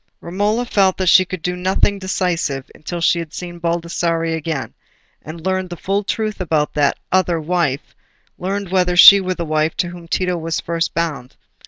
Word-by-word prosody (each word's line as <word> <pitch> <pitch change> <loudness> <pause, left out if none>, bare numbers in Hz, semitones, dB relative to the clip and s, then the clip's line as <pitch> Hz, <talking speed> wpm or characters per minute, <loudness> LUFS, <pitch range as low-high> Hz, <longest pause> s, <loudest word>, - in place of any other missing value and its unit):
Romola 205 +7 -1
felt 195 -5 +2
that 190 - -1
she 185 +1 +6
could 185 -2 -7
do 180 0 -1
nothing 190 +2 0
decisive 175 -7 -2
until 175 +3 -6
she 170 0 +3
had 165 -2 -7
seen 175 -1 -7
Baldassarre 170 -1 -1
again, 160 -3 -4 0.5
and 160 +1 -10
learned 185 -1 -1
the 175 - -7
full 200 +4 -1
truth 215 0 -3
about 155 -4 0
that 145 -1 +1
"other 180 -3 +2
wife"—learned 175 +4 -4
whether 180 -1 +1
she 200 +2 +10
were 185 0 -2
the 170 - -4
wife 155 0 0
to 175 - -1
whom 175 -1 -11
Tito 180 +1 -1
was 165 0 -3
first 165 0 -2
bound. 150 -7 -3
175 Hz, 175 wpm, -19 LUFS, 165-185 Hz, 0.5 s, she